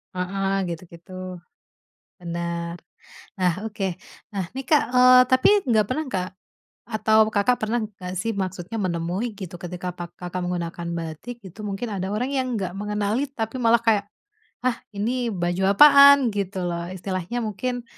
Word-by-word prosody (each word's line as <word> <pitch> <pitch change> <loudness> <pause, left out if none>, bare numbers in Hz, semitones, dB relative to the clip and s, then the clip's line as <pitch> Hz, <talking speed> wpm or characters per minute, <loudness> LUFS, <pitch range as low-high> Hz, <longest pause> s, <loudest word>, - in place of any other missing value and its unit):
Heeh, 195 +2 -1 0.2
gitu 170 +1 -5
gitu, 170 +2 -14 1.1
bener. 170 0 -4 0.6
Nah, 180 -2 +3
oke. 215 -2 -4 0.5
Nah 195 - -1
nih 270 0 -4
Kak, 300 -2 +5
eee, 255 0 +8
tapi 260 0 +5 0.2
nggak 215 -3 +4
pernah 305 +5 -1
nggak? 185 -3 -2 0.6
Atau 220 0 +3 0.2
Kakak 225 +5 +3
pernah 225 +3 0
nggak 185 -4 -8
sih 225 +1 -1
maksudnya 185 +4 -5
menemui 175 +5 -1
gitu 185 -4 -7
ketika 180 0 -5
pak 175 -1 -6
Kakak 180 0 -4
menggunakan 170 -1 -3
batik 165 +9 -6
itu 185 +4 -12
mungkin 200 +5 -3
ada 190 0 -3
orang 250 +5 -1
yang 260 - 0
nggak 185 -2 -3
mengenali 210 +3 -1
tapi 225 -1 -4
malah 230 +1 +5
kayak, 210 -3 +4 0.6
ah, 250 -2 +2 0.2
ini 240 +4 -1
baju 175 0 -1
apaan 280 +3 +9 0.2
gitu 195 -1 -2
loh 170 0 -3
istilahnya 185 +4 -4
mungkin 245 +4 -3
195 Hz, 150 wpm, -24 LUFS, 180-235 Hz, 1.1 s, apaan